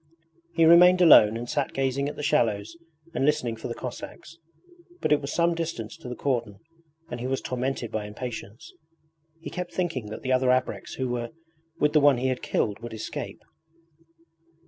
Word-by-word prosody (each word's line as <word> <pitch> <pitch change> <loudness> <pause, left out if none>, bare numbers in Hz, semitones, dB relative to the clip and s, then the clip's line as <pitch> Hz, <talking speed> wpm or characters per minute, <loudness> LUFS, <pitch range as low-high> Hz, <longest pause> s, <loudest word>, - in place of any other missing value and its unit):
He 165 - +5
remained 180 +2 +7
alone 115 -11 +7
and 120 +1 -6
sat 145 +1 -2
gazing 135 +1 0
at 150 - -8
the 150 - -6
shallows 115 -7 +1 0.4
and - - -1
listening 145 -5 +1
for 110 - -7
the 120 - -5
Cossacks; 155 +5 -8 0.6
but - - -1
it 150 - +4
was 140 - -5
some 170 0 +2
distance 165 -10 -4
to 125 - -9
the 125 - -5
cordon 120 -8 -2 0.5
and 120 - -4
he 125 - -3
was 135 0 -1
tormented 125 -1 -3
by 105 -1 -3
impatience. 110 0 -8 0.7
He - - -7
kept 180 -1 -5
thinking 165 - -2
that 110 - -8
the 130 - -1
other 130 0 +2
ABREKS 130 0 0
who 130 - -2
were 120 -1 -3 0.5
with 150 0 +2
the 155 - +6
one 140 -2 +5
he 130 +2 0
had 130 - -2
killed 105 -1 -1
would 120 0 -8
escape. 110 - -6
130 Hz, 185 wpm, -26 LUFS, 120-150 Hz, 0.7 s, remained